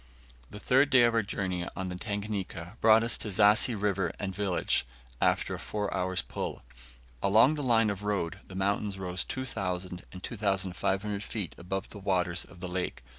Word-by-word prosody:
The 105 - -9
third 135 +6 +4
day 130 -3 +6
of 120 -1 +4
our 115 - +3
journey 95 -4 -3
on 95 - -3
the 90 - -4
Tanganika 100 -2 -4
brought 110 0 +6
us 115 - +2
to - - -1
Zassi 105 +3 +4
River 100 -2 0
and 95 -2 -3
village, 95 -1 +1 0.4
after - - +2
a - - -4
four 105 -1 -3
hours' 90 0 0
pull. - - -5 0.6
Along 110 +8 +5
the 150 - -3
line 115 -5 +3
of 100 0 -5
road 100 -3 -2
the 95 - -10
mountains 100 +1 0
rose 90 -1 -3
2,000 90 -8 -3
and 90 0 -10
2,500 100 -1 -1
feet 105 -6 -4
above 95 +2 -5
the 105 - -9
waters 90 -3 0
of 90 -2 -16
the 90 - -3
lake. 90 -6 -3
100 Hz, 175 wpm, -29 LUFS, 95-110 Hz, 0.6 s, day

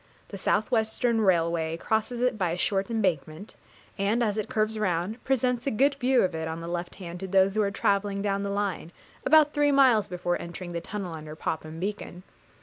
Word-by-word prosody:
The 200 - -7
South 210 +5 0
Western 225 0 +1
railway 165 -4 +1
crosses 220 +6 -1
it 250 -1 +2
by 185 -5 0
a 170 - -2
short 195 +2 0
embankment, 185 -4 -2 0.4
and, 210 +5 +1
as 210 -3 0
it 215 -2 -3
curves 215 0 0
round, 190 +3 -1
presents 250 -1 0
a - - +4
good 275 +5 +3
view 260 -1 +2
of 185 -2 0
it 160 0 -3
on 160 +1 -4
the 165 - -7
left 175 0 -4
hand 175 -2 -8
to 190 - -5
those 190 +1 +3
who 215 - +1
are 200 - +1
travelling 200 0 0
down 200 -1 0
the 200 - -2
line, 200 -5 -2 0.4
about 300 +1 +6
three 290 -1 +3
miles 255 -7 +5
before 175 -1 -2
entering 175 +1 -7
the 170 -1 -3
tunnel 190 -1 -5
under 155 -1 -8
Popham 155 0 -4
Beacon. 190 -2 -5
200 Hz, 205 wpm, -27 LUFS, 175-220 Hz, 0.4 s, about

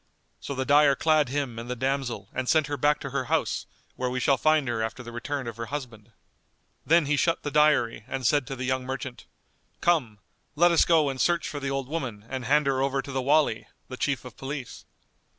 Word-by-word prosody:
So 140 - -5
the 130 0 -2
dyer 145 0 +5
clad 155 -2 +2
him 135 -4 -2
and 120 +1 -8
the 125 - -2
damsel 130 -5 -2
and 130 -1 -2
sent 155 -2 +4
her 145 +1 -3
back 145 +2 +2
to - - -5
her - - -1
house - - -1 0.3
where 125 0 -2
we 130 +1 -2
shall 135 +2 +3
find 155 -3 +3
her 120 -2 -1
after 110 +3 -4
the 120 - -9
return 135 +3 -4
of 115 -1 -6
her 115 0 -5
husband. 120 -6 -7 0.7
Then 165 0 +4
he 150 +1 +1
shut 165 +3 +1
the 145 - -3
dyery 150 -8 +3
and 130 0 -4
said 145 +1 +2
to 135 - -4
the 130 0 -4
young 130 0 0
merchant, 130 -1 -6 0.5
"Come, 135 -12 +1 0.4
let 175 +3 +5
us 170 - +4
go 160 -4 +4
and 130 -1 -3
search 170 -1 +1
for 145 - -5
the 135 -1 -3
old 135 -1 -2
woman 130 -9 -5
and 130 0 -5
hand 150 +4 +3
her 135 -1 +1
over 135 0 0
to 140 - -8
the 135 -1 -1
Wali,[FN#198] 140 -4 +2 0.2
the 130 - -7
Chief 140 -1 -1
of 125 - -10
Police." 135 -2 -7
135 Hz, 225 wpm, -26 LUFS, 125-150 Hz, 0.7 s, dyer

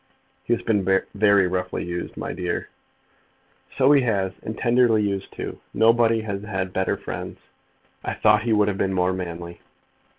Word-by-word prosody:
"He 120 - +1
has - - -9
been 105 -3 +1 0.3
very 100 -2 +4
roughly 90 0 -3
used, 85 0 -5
my - - -4
dear." 90 -2 -3 1.1
"So 135 +1 +5
he 145 -2 +6
has, 100 -6 0
and 110 - -6
tenderly 120 -3 +3
used 100 -1 -3
too. - - -6 0.2
Nobody 115 0 +4
has 100 -2 -4
had 95 -3 -4
better 95 0 0
friends. - - -6 0.7
I - - -3
thought 105 0 +4
he 115 +1 -1
would 105 -1 +3
have 100 -2 -2
been 95 0 0
more 90 0 +1
manly." 85 -1 -6
100 Hz, 165 wpm, -23 LUFS, 95-110 Hz, 1.1 s, he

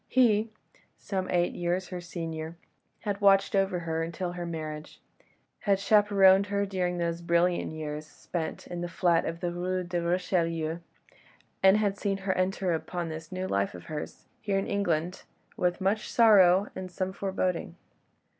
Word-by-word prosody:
He, 225 -3 +3 0.5
some 190 -2 -3
eight 175 -1 +1
years 175 +1 -2
her 180 -1 -5
senior, 165 -1 -6 0.4
had 205 -2 -3
watched 195 0 +4
over 195 -2 +1
her 165 -1 -2
until 170 +2 -3
her 175 -1 -5
marriage; 155 -2 -6 0.6
had 200 -2 +2
chaperoned 200 -1 +5
her 200 +1 0
during 180 -2 -1
those 170 0 -2
brilliant 170 0 +1
years 155 -1 -5
spent 160 +2 -5
in 175 -1 -6
the 175 - -3
flat 170 -1 +2
of 165 +1 -4
the 175 -1 -1
Rue 180 +1 -2
de 175 0 -2
Richelieu, 170 -2 0 0.8
and 190 +1 +6
had 205 -2 0
seen 200 -2 0
her 190 - +2
enter 185 -1 0
upon 170 +1 -3
this 160 0 -7
new 185 0 -3
life 100 - -1
of 85 - -10
hers, 150 -1 -7 0.2
here 200 -2 0
in 195 - 0
England, 180 -2 -1 0.3
with 180 0 0
much 200 +3 0
sorrow 200 -5 +6
and 185 -1 -5
some 185 +1 -3
foreboding. 185 - -2
180 Hz, 160 wpm, -28 LUFS, 170-195 Hz, 0.8 s, and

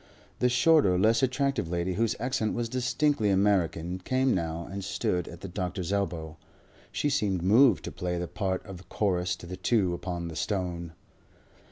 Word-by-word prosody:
The 125 - +3
shorter, 125 - +4
less 110 +4 +3
attractive 135 - 0
lady, 90 +1 -1
whose 115 +3 0
accent 125 -4 -1
was 120 -1 -2
distinctly 125 -1 +1
American, 90 -3 +1
came 130 +6 +1
now 85 -2 -2
and 100 0 -6
stood 90 -2 -1
at 85 - -10
the - - -6
doctor's 90 0 -3
elbow. 85 -6 -2 0.5
She - - -1
seemed 105 -11 0
moved 110 +3 +5
to - - -5
play 90 -2 -3
the 90 0 -3
part 95 -1 -2
of 95 -3 -10
chorus 90 -3 0
to 85 - -12
the 90 +1 -7
two 95 -2 +1
upon 85 -1 -4
the 80 - -7
stone. 85 -3 -3
95 Hz, 170 wpm, -28 LUFS, 90-115 Hz, 0.5 s, moved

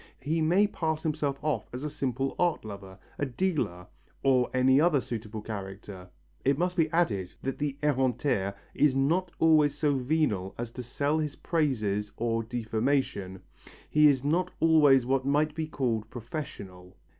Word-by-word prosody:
He 160 +4 0
may 175 +6 +4
pass 160 -6 -2
himself 150 -3 -1
off 150 -2 -1
as 125 +3 -6
a 150 - -2
simple 135 -1 -2
art 175 -9 +1
lover, 100 -3 -9 0.2
a 145 - +1
dealer, 130 - -2 0.4
or 130 -2 +3
any 130 +2 +4
other 165 -4 +4
suitable 110 -3 -6
character. 95 -3 -7 0.3
It 140 +1 +2
must 180 +2 0
be 165 -3 +2
added 110 - 0
that 135 - -3
the 145 -2 -2
ereinteur 125 -7 +1 0.2
is 145 -3 +3
not 165 +7 +1
always 155 -3 +4
so 150 -1 +2
venal 125 -9 0
as 120 -1 -5
to 125 - -7
sell 140 +5 -1
his 150 -2 -2
praises 110 - -1
or 115 -1 0
defamation, 110 -4 -2 0.5
he 150 0 +6
is 135 -3 +3
not 175 +5 +1
always 150 -6 +5
what 135 +1 +1
might 150 +3 +1
be 160 0 -3
called 115 -7 -2
professional. 100 - -8
135 Hz, 155 wpm, -28 LUFS, 110-155 Hz, 0.5 s, he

